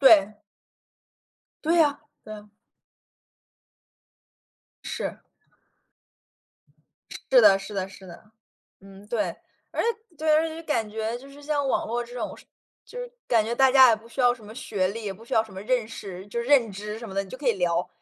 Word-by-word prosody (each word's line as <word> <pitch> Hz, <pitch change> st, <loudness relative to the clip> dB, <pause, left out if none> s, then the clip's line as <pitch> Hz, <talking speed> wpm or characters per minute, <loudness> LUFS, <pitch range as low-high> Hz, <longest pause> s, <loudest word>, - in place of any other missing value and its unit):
对。 215 Hz, -6 st, +6 dB, 1.3 s
对 330 Hz, +1 st, +5 dB
啊 290 Hz, -1 st, 0 dB, 0.2 s
对 215 Hz, -, -9 dB
啊。 210 Hz, 0 st, -12 dB, 2.3 s
是。 -, -, -4 dB, 2.1 s
是 -, -, +8 dB
的 195 Hz, -, +7 dB
是 195 Hz, +2 st, -9 dB
的 190 Hz, -1 st, -2 dB
是 190 Hz, -1 st, -13 dB
的， 185 Hz, +5 st, -13 dB, 0.5 s
嗯， 195 Hz, +1 st, -14 dB
对。 230 Hz, -1 st, -1 dB, 0.4 s
而 -, -, -1 dB
且 465 Hz, -, +2 dB, 0.3 s
对， 315 Hz, 0 st, -1 dB
而 310 Hz, +1 st, +4 dB
且 325 Hz, -, -2 dB
就 315 Hz, -, -7 dB
是 330 Hz, -, -8 dB
感 230 Hz, -9 st, -1 dB
觉， 220 Hz, +2 st, -3 dB
就 275 Hz, +2 st, -13 dB
是 285 Hz, +1 st, -14 dB
像 285 Hz, -1 st, -1 dB
网 -, -, +1 dB
络 240 Hz, +2 st, -1 dB
这 240 Hz, +1 st, -13 dB
种 245 Hz, -, -4 dB, 0.5 s
就 -, -, -11 dB
是 -, -, -6 dB, 0.2 s
感 230 Hz, -3 st, +4 dB
觉 235 Hz, -, -2 dB
大 265 Hz, +2 st, +5 dB
家 260 Hz, -2 st, +8 dB
也 225 Hz, -, +5 dB
不 220 Hz, +2 st, -15 dB
需 255 Hz, +2 st, -3 dB
要 245 Hz, 0 st, +5 dB
什 230 Hz, -3 st, -15 dB
么 215 Hz, +2 st, -11 dB
学 195 Hz, -6 st, -1 dB
历， 225 Hz, +4 st, -5 dB
也 200 Hz, -2 st, -3 dB
不 220 Hz, +4 st, -15 dB
需 -, -, -5 dB
要 220 Hz, -, +4 dB
什 220 Hz, -, -14 dB
么 190 Hz, -, -7 dB
认 235 Hz, 0 st, 0 dB
识 190 Hz, -4 st, -8 dB
就 220 Hz, +3 st, -3 dB
认 240 Hz, -2 st, +3 dB
知 210 Hz, +2 st, -6 dB
什 230 Hz, -1 st, -8 dB
么 190 Hz, -, -8 dB
的， 195 Hz, 0 st, 0 dB
你 190 Hz, -, -14 dB
就 -, -, -8 dB
可 270 Hz, -1 st, -3 dB
以 235 Hz, -, +5 dB
聊。 175 Hz, -2 st, 0 dB
225 Hz, 210 characters per minute, -26 LUFS, 200-265 Hz, 2.3 s, 是